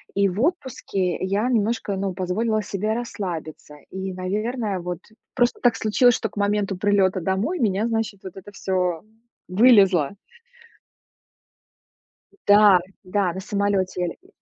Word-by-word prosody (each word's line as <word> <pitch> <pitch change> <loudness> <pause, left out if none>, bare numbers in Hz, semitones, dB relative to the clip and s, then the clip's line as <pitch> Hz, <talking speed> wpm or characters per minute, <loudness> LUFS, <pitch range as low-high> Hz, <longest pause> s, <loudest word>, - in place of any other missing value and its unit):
И 200 0 +3
в 190 +4 -3
отпуске 260 - -1
я 200 +5 -1
немножко, 225 -3 0
ну, 195 0 -2
позволила 215 +5 -1
себе 205 +2 -2
расслабиться. 175 -10 -6 0.2
И, 190 0 -5
наверное, 205 +3 -2
вот 175 -1 -5 0.4
просто 245 -1 +1
так 245 -2 +3
случилось, 235 +3 +3
что 220 - -3
к - - -17
моменту 205 -1 0
прилёта 195 -1 +2
домой 195 - -1
у - - 0
меня, 205 +1 +1
значит, 225 -3 -2
вот 190 - -9
это 195 +2 -11
всё 180 -4 -1 0.5
вылезло. 195 - +5 2.4
Да 205 -2 +7 0.3
да, 185 -1 0
на 190 - -5
самолёте 200 -1 -1
я 180 - +1
ле - - -9
э 370 - -23
200 Hz, 140 wpm, -23 LUFS, 185-220 Hz, 2.4 s, Да